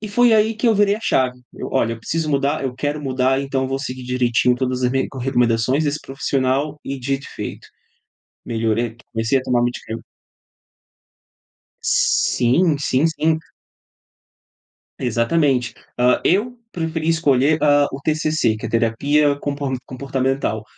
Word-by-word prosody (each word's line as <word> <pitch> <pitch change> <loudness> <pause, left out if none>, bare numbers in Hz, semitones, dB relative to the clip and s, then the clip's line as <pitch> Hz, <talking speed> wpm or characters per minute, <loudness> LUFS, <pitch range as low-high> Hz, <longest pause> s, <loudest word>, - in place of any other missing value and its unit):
e 215 - -6
foi 240 +3 +4
aí 220 +1 +3
que 220 +3 -1
eu 225 - +4
virei 205 0 +3
a - - -10
chave, 125 - 0
eu: - - -6
"Olha, 115 -3 +1
eu 115 - -12
preciso 155 +6 -2
mudar, 140 +1 0
eu 130 -2 -2
quero 145 +3 -2
mudar, 130 -1 +1
então 135 -1 -2
vou 135 0 -2
seguir 130 -1 -5
direitinho 125 -1 +2
todas 130 0 -2
as 125 - +2
me 135 +1 0
recomendações 125 +2 +1
desse 150 +1 -1
profissional", 135 +2 -1
e 135 0 -4
dito 135 +2 -2
e - - -13
feito, - - -6 0.8
melhorei. 115 0 -1 0.2
Comecei 115 +4 +1
a - - -7
tomar 120 -2 +1
medicamen 120 -2 -4 1.8
Sim, 145 +7 +2
sim, 140 0 +1
sim. 160 0 +1 1.6
Exatamente. 125 +1 +1 0.2
Hã, 125 +1 +4
eu 230 +7 +1
preferi 160 -2 -3
escolher, 150 -2 +3
hã, 145 -1 +5
o 135 - -5
TCC, 155 -6 +1
que - - -6
é - - -4
terapia 140 +6 +2
compo 140 -1 -3
comportamental 130 -4 -2
135 Hz, 145 wpm, -20 LUFS, 125-155 Hz, 1.8 s, hã